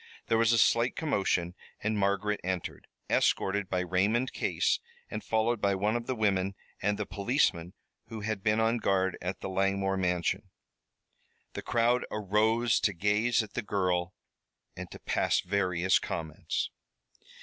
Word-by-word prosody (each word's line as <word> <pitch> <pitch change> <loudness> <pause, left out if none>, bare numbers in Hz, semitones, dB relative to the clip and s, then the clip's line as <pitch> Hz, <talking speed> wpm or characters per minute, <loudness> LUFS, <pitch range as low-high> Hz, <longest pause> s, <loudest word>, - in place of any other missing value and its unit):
There 115 - +4
was 115 -1 +4
a 115 - +4
slight 115 +2 +3
commotion, 95 - 0 0.3
and 110 +1 -1
Margaret 100 +1 0
entered, 95 -1 -4 0.2
escorted 100 0 +1
by 90 -1 0
Raymond 100 +8 +1
Case, - - +1 0.3
and - - -4
followed 110 +1 0
by 100 -1 +2
one 105 +4 0
of 120 0 -3
the 130 - -1
women 100 -3 +1 0.3
and 105 +1 +1
the 105 - -2
policeman 100 - 0 0.3
who 110 -1 -7
had 105 -2 -2
been 105 +2 +2
on 115 +1 +2
guard 95 -3 +1
at 90 +2 -4
the - - -4
Langmore 95 0 0
mansion. 90 -2 -1 1.0
The - - -5
crowd 120 +1 +2
arose 110 +3 +2
to 105 - +1
gaze 105 +6 +2
at 110 - -11
the 120 - -2
girl 90 -4 -1 0.6
and - - -7
to - - -9
pass - - +1
various 90 -1 +1
comments. 80 -3 -3
100 Hz, 150 wpm, -29 LUFS, 95-110 Hz, 1.0 s, There